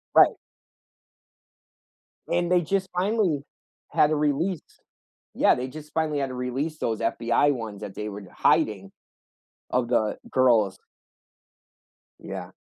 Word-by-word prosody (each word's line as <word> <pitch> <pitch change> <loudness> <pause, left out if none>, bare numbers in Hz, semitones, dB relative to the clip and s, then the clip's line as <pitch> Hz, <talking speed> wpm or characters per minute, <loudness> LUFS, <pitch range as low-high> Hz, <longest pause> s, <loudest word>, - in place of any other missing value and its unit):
Right. - - +7 1.9
And 175 0 0
they 180 -1 +5
just 190 +3 -1
finally 185 -6 +1 0.5
had 150 - +4
to 155 - 0
release 150 +4 0 0.7
Yeah, - - +5
they 125 +1 -3
just 150 +2 -11
finally 155 -2 0
had 135 - 0
to 130 - -6
release 130 +5 -3
those 110 -2 -1
FBI 115 +4 +2
ones- 110 -5 -6
that 100 -2 -7
they 105 0 -4
were 100 0 -7
d 95 - -13
hiding- 105 -11 +2 0.8
of 125 -1 +1
the 110 -2 +1
girls. 115 -7 +3 1.4
Yeah. - - -7
135 Hz, 130 wpm, -25 LUFS, 115-155 Hz, 1.9 s, Right